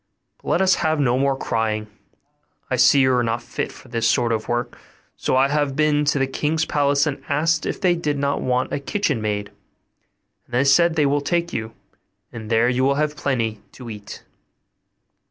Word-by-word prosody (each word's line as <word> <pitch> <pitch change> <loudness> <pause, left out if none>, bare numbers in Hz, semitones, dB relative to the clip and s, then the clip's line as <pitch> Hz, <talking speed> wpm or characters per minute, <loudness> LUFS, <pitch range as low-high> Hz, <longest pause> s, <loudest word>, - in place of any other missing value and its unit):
but - - -7
let 175 - +2
us 190 0 +4
have 155 -1 +1
no 125 -4 +2
more 135 0 +1
crying; 110 -3 -1 0.9
I - - +2
see 140 - +5
you 130 0 +3
are 125 -1 +2
not 115 +1 -2
fit - - -4
for - - -15
this 115 -2 -1
sort 120 0 +1
of 110 -1 -2
work, 120 0 -2 0.4
so - - -1
I 135 +1 +4
have 145 -2 0
been 150 0 +2
to 145 0 +1
the 135 - +2
king's 155 +4 -1
palace, 140 -1 +2
and 145 -2 -3
asked 155 +2 +1
if - - -3
they 180 -2 +3
did 150 -4 -2
not 140 0 -1
want 125 0 -1
a - - -1
kitchen 145 - -1
maid; 105 -1 -2 1.0
and 120 - -6
they 130 - +3
say 140 +5 +5
they 160 -3 0
will 145 +1 +1
take 170 +3 -1
you, 110 0 -4 0.6
and 110 -2 -8
there 115 +1 +3
you 125 +1 +1
will 140 +1 +3
have 150 +1 -1
plenty 115 -8 -2
to 120 -3 -9
eat. 105 -1 -10
135 Hz, 200 wpm, -22 LUFS, 120-150 Hz, 1.0 s, see